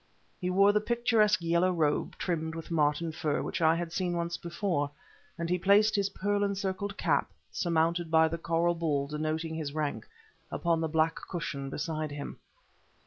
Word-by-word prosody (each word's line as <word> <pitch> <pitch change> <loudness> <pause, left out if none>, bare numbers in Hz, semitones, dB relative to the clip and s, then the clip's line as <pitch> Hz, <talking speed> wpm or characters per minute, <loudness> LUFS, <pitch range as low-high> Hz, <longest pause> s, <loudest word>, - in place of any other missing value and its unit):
He 180 - -2
wore 195 +2 +5
the 210 0 +2
picturesque 215 -4 +2
yellow 170 +2 +3
robe, 155 -4 0
trimmed 160 -2 -2
with 165 0 -7
marten 155 +1 +1
fur, 155 -2 -1
which - - -3
I 160 0 +5
had 170 0 -3
seen 175 -2 -1
once 170 0 -2
before, 170 -4 -2 0.5
and 170 -1 -2
he 180 +1 0
placed 205 +4 +4
his 200 -1 +1
pearl 205 +1 0
encircled 200 0 -2
cap, - - +1 0.2
surmounted 170 0 +1
by 160 0 +5
the 165 +1 -4
coral 170 +1 +1
ball 155 -5 0
denoting 155 +2 -2
his 155 -2 -4
rank, 150 -2 -2 0.4
upon 170 -1 0
the 160 - 0
black 160 +1 +2
cushion 145 -6 -4
beside 155 +1 -3
him. 145 0 -7
170 Hz, 170 wpm, -30 LUFS, 160-185 Hz, 0.5 s, wore